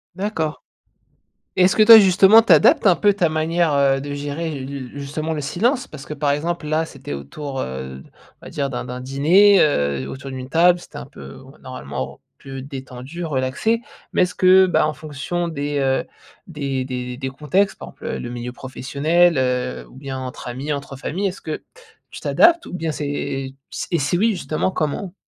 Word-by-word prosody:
D'accord, 180 -6 -3 0.9
et 185 - +4
est-ce 185 - +4
que 215 - +7
toi, 225 +1 +11
justement, 195 +2 +7
tu 225 - 0
adaptes 155 +5 +6
un 180 - +6
peu 205 -1 +3
ta 180 -5 +1
manière, 160 +1 +1
heu, 135 -1 +3
de 145 +1 -5
gérer 145 +3 -4
le 130 -1 -6
justement 155 +3 -3
le 155 - -3
silence? 240 - 0
Parce 150 -2 -10
que, - - -6
par 145 -1 0
exemple 165 +2 -2
là, 155 +2 +1
c'était 135 - -8
autour, 135 - -6
heu, 65 0 -6 0.4
on - - -14
va - - -8
dire 140 -1 -2
d'un 125 - -4
d'un 125 0 -6
dîner, 170 +10 +5
heu, 70 - +1
autour 135 +1 -8
d'une 130 0 -7
table, 175 +3 +4
c'était 175 - -12
un - - -7
peu 70 0 -12
on 130 - -14
v - - -20
normalement 70 - -6
re - - -29 0.2
plus 135 -1 -8
détendu, 135 +4 -7
relaxé. 150 - 0 0.3
Mais - - +3
est-ce 180 - -3
que, 185 0 +6
ben, 175 - +2
en 155 - -1
fonction 155 +5 -4
des 145 -2 -3
heu, 135 +4 +1 0.4
des 140 -6 -3
des 125 -1 -5
des 130 0 -4
contextes, 155 +9 0
par - - -8
exemple, - - -14
heu, - - -3
le 120 - -6
milieu 120 0 -5
professionnel, 140 +6 +1
heu, 125 -1 -1
ou - - -18
bien 135 -1 -6
entre 130 -1 -7
amis, 135 +5 -4
entre 140 -1 -6
familles, 180 +8 -2
est-ce 190 0 -6
que 155 - -5 0.5
tu - - -8
t'adaptes? 340 0 +4
Ou - - -10
bien 165 -3 -2
c'est 150 -1 -4 0.8
et 170 - +2
si 145 +5 0
oui, 225 +5 +3
justement, 175 -3 -2
comment? 170 +3 -3
145 Hz, 200 wpm, -21 LUFS, 130-175 Hz, 0.9 s, toi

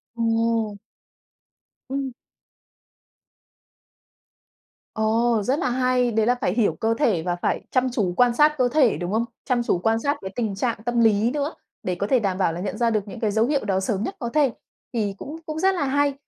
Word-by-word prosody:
Ồ. 230 -2 0 1.1
Ừm. 270 -1 -2 2.8
Ồ, 225 +1 +2
rất 265 +6 0
là 255 - 0
hay, 250 -1 +1
đấy 220 0 +2
là 245 +2 +3
phải 180 - +1
hiểu 225 -2 +2
cơ 225 +1 +1
thể 210 - +2
và 175 -1 -1
phải 175 - -1
chăm 255 0 +2
chú 205 -7 0
quan 245 -1 +4
sát 300 +1 +4
cơ 255 - +3
thể, 260 -4 +3
đúng 175 +2 -4
không? 225 +2 +1 0.2
Chăm 250 -3 +1
chú 180 - +1
quan 225 +4 +1
sát 285 +4 0
cái 190 0 -6
tình 220 -5 -2
trạng 230 +4 -1
tâm 240 -1 0
lý 220 +1 +3
nữa, 295 +2 -2 0.3
để 180 -1 -1
có 200 +3 -2
thể 255 0 +3
đảm 195 -3 -1
bảo 175 -4 +1
là 170 - -5
nhận 200 +1 -4
ra 235 0 +2
được 215 -2 -1
những 225 - -8
cái 215 -3 0
dấu 220 +2 +2
hiệu 280 -3 0
đó 190 -2 +1
sớm 195 +1 -1
nhất - - -4
có 235 - -3
thể. 280 -2 +2 0.4
Thì 205 -4 -1
cũng 300 +9 -7
cũng 310 0 -4
rất 385 +1 +3
là 335 - 0
hay. 285 +1 +2
230 Hz, 205 wpm, -23 LUFS, 210-255 Hz, 2.8 s, quan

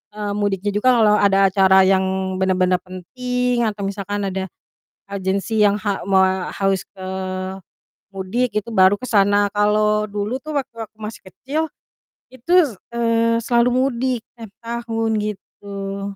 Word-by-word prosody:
eee, 205 -1 -3
mudiknya 205 -1 -1
juga 210 +5 +2
kalau 210 -2 +5
ada 195 -1 +4 0.2
acara 190 -1 +5
yang 190 0 +1
bener-bener 185 -1 +2
penting 250 +7 -2
atau 205 -1 -4
misalkan 205 +1 -3
ada 190 0 -4 0.6
urgensi 200 +3 -1
yang 205 -1 +4
ha 200 -2 -1
moa 190 -1 +2
harus 195 -1 0
ke 190 -2 -13 1.1
mudik, 195 +6 -1
itu 215 +2 -2
baru 190 -1 +5
ke 255 - -6
sana. 205 -1 +3
Kalau 210 0 +2
dulu 210 +4 -3
tuh 310 - -6
waktu 270 -3 -3
aku 215 - -14
masih 215 +1 -7
kecil, 290 - -3 0.7
itu 260 +6 -11 0.2
s 235 - -8 0.2
eee, 230 0 +2
selalu 235 +1 +3
mudik 255 -1 0
tiap 225 -3 -10
tahun 225 -1 -2
gitu. 200 -1 -6
205 Hz, 140 wpm, -20 LUFS, 195-230 Hz, 1.1 s, kalau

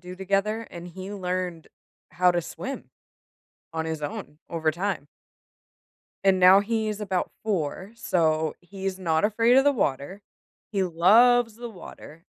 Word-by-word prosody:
do 180 0 -9
together, 195 +4 -1
and 175 0 -8
he 185 +3 -8
learned 180 -3 -3 0.4
how 180 +3 +3
to 175 0 +1
swim. 265 +10 -7 0.9
On 160 0 -2
his 160 -1 -4
own, 145 0 -6
over 160 -2 0
time. 175 -2 -3 1.2
And 190 -1 +4
now, 185 +2 +8
he 220 +1 -1
is 210 0 -4
about 190 -3 -2
4, 190 -1 -2
so 160 -7 +1
he 190 +2 -8
is 190 -1 -1
not 165 -3 +1
afraid 230 +4 +3
of 270 - +6
the 285 - +5
water. 185 - -2 0.5
He 195 -3 0
loves 225 +7 +4
the 240 +1 -7
water, 165 -5 -12
185 Hz, 150 wpm, -25 LUFS, 170-210 Hz, 1.2 s, now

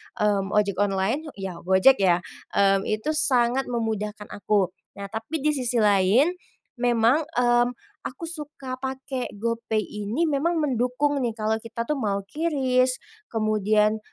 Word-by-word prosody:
mmm, 205 -1 0
ojek 200 -2 +1
online, 205 +9 0
ya 190 -3 -6
Gojek 190 +10 +4
ya, 180 -2 +3 0.3
mmm, 195 0 +3
itu 215 +8 -1
sangat 265 -4 +2
memudahkan 215 -3 -3
aku. 200 -2 0 0.2
Nah, 200 0 -8
tapi 265 +7 -4
di 305 - +3
sisi 250 -4 -2
lain 205 - +4 0.5
memang, 245 +5 +3
mmm, 240 0 +3 0.4
aku 365 - -10
suka 295 -6 -6
pakai 265 -1 -4
GoPay 225 0 -1
ini 210 +10 -3
memang 320 +2 +1
mendukung 270 +2 0
nih, 235 -4 -1
kalau 220 0 -1
kita 230 +1 -5
tuh 290 +4 -2
mau 200 -4 -1
QRIS, 255 0 +1 0.3
kemudian, 215 -1 +1
230 Hz, 135 wpm, -25 LUFS, 205-265 Hz, 0.5 s, Gojek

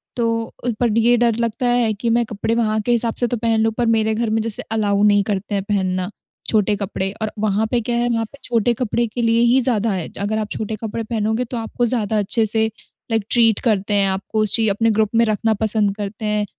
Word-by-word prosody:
तो 230 -1 -1 0.3
पर 230 -2 +1
ये 240 +2 +4
डर 235 -2 +2
लगता 235 +2 -1
है 240 -3 +2
कि 230 +3 -3
मैं 240 - +3
कपड़े 215 +2 -2
वहाँ 220 -2 +1
के 240 - -1
हिसाब 230 -1 +2
से 245 - +2
तो 240 - -2
पहन 225 0 +1
लूँ 225 0 +2
पर 240 - +1
मेरे 220 0 +1
घर 230 -1 -1
में 220 0 +1
जैसे 225 -1 -2
अलाउ 205 -2 +1
नहीं 205 -1 +4
करते 200 +1 -2
हैं 195 - -1
पहनना 185 -2 -1 0.4
छोटे 210 -1 +2
कपड़े। 195 -1 -3
और 215 - -2
वहाँ 215 +1 +1
पे 245 - +2
क्या 235 +2 -2
है 240 0 +1
वहाँ 225 -1 0
पे 280 - -14
छोटे 235 0 +1
कपड़े 235 0 -1
के 240 +3 -4
लिए 230 0 +2
ही 265 - +5
ज़्यादा 230 -3 +2
है 185 -4 -3
अगर 215 +2 -1
आप 210 -1 -3
छोटे 220 0 -4
कपड़े 225 +1 -4
पहनोगे 220 +1 -1
तो 245 - -2
आपको 230 +2 -2
ज़्यादा 220 -3 0
अच्छे 215 +3 +1
से 220 +1 +4 0.5
लाइक 220 -2 0
ट्रीट 225 -3 +4
करते 205 0 0
हैं 200 -1 +3
आपको 190 +3 -2
उस 210 -2 +2
चीज़ 220 -2 +3
अपने 225 +3 +1
ग्रुप 215 -1 +1
में 230 0 +4
रखना 220 +1 +1
पसंद 210 -2 +1
करते 210 +1 -6
हैं। 210 0 0
220 Hz, 240 wpm, -20 LUFS, 210-230 Hz, 0.5 s, ही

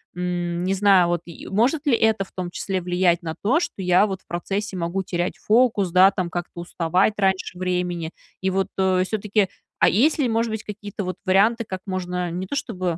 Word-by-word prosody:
м, 175 -1 -2
не 190 +1 0
знаю, 195 -2 +5
вот, 175 -1 0
и 170 - -11
может 255 +10 +1
ли 260 -5 +4
это 220 -3 +2
в - - -17
том 180 -2 -5
числе 190 +1 -3
влиять 180 -1 +1
на 160 -1 -4
то, 255 +11 +3
что 205 - -4
я 180 +2 +4
вот 190 -2 -5
в - - -37
процессе 195 +3 -3
могу 175 +3 -2
терять 175 0 -2
фокус, 220 -4 +2
да, 185 +2 +6
там, 185 -3 -3
как-то 175 0 -5
уставать 175 +4 +1
раньше 190 -2 0
времени. 180 -2 -2 0.3
И 190 - +1
вот, 190 +1 0
э, 190 -1 +2
все-таки 210 -1 0 0.3
А - - +6
есть 280 +10 +3
ли, 285 -5 +1
может 230 0 0
быть, 220 -1 -4
какие-то 205 0 -6
вот 185 0 -4
варианты, 210 +5 +3
как 190 -3 -6
можно 180 -2 -3
не 180 +2 -4
то, - - -4
чтобы 185 -10 -2
190 Hz, 210 wpm, -23 LUFS, 180-205 Hz, 0.3 s, да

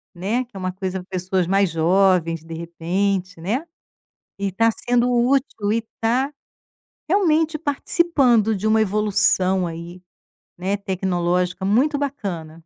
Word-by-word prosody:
né, 210 +8 -1
que 240 - -29
é - - -6
uma 185 0 -2
coisa 190 0 -4
pra 180 - -12
pessoas 185 -1 -1
mais 195 0 +2
jovens, 165 -1 +2
de 165 0 -9
repente, 180 +2 -2
né. 235 - -2 0.7
E 200 0 -1
está 225 +4 +2
sendo 245 +2 0
útil 240 -4 +1
e 230 - +2
está, 235 +4 -1 0.8
realmente, 325 -5 +2
participando 275 - +2
de 210 +3 -2
uma 220 0 +4
evolução 195 -3 +2
aí, 170 +2 -8 0.6
né, 190 +3 -1
tecnológica 180 -1 -1
muito 265 +9 +2
bacana. 195 - -4
195 Hz, 135 wpm, -22 LUFS, 180-240 Hz, 0.8 s, uma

